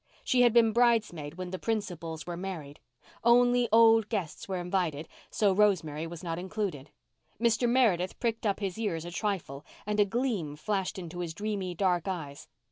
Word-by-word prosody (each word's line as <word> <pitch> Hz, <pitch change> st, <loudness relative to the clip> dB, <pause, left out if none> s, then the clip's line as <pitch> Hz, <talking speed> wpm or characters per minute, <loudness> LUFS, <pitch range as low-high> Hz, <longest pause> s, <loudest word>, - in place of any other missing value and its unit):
She 250 Hz, -, +3 dB
had 240 Hz, -1 st, +6 dB
been 230 Hz, -1 st, +5 dB
bridesmaid 215 Hz, -11 st, +1 dB
when 185 Hz, 0 st, -6 dB
the 185 Hz, -, -4 dB
principals 175 Hz, -8 st, -3 dB
were 175 Hz, 0 st, -5 dB
married. 170 Hz, -6 st, -6 dB, 0.4 s
Only 245 Hz, +1 st, +4 dB
old 225 Hz, -1 st, +6 dB
guests 190 Hz, -9 st, -4 dB
were 190 Hz, -1 st, -2 dB
invited, 175 Hz, -4 st, -2 dB, 0.2 s
so 205 Hz, -3 st, +2 dB
Rosemary 165 Hz, -6 st, +1 dB
was 170 Hz, 0 st, -9 dB
not 165 Hz, -1 st, -3 dB
included. 185 Hz, -7 st, -4 dB, 0.5 s
Mr. 235 Hz, +1 st, +2 dB
Meredith 215 Hz, -8 st, +2 dB
pricked 230 Hz, -1 st, -1 dB
up 200 Hz, +1 st, -1 dB
his 195 Hz, +1 st, -3 dB
ears 170 Hz, -7 st, -2 dB
a 175 Hz, -, -6 dB
trifle 175 Hz, -8 st, -3 dB, 0.2 s
and 210 Hz, 0 st, -1 dB
a 205 Hz, -, +6 dB
gleam 205 Hz, -, -2 dB
flashed 190 Hz, +5 st, -2 dB
into 175 Hz, -1 st, -7 dB
his 170 Hz, -2 st, -4 dB
dreamy 200 Hz, -3 st, -3 dB
dark 180 Hz, -1 st, +1 dB
eyes. 150 Hz, -7 st, -5 dB
190 Hz, 170 wpm, -29 LUFS, 170-220 Hz, 0.5 s, had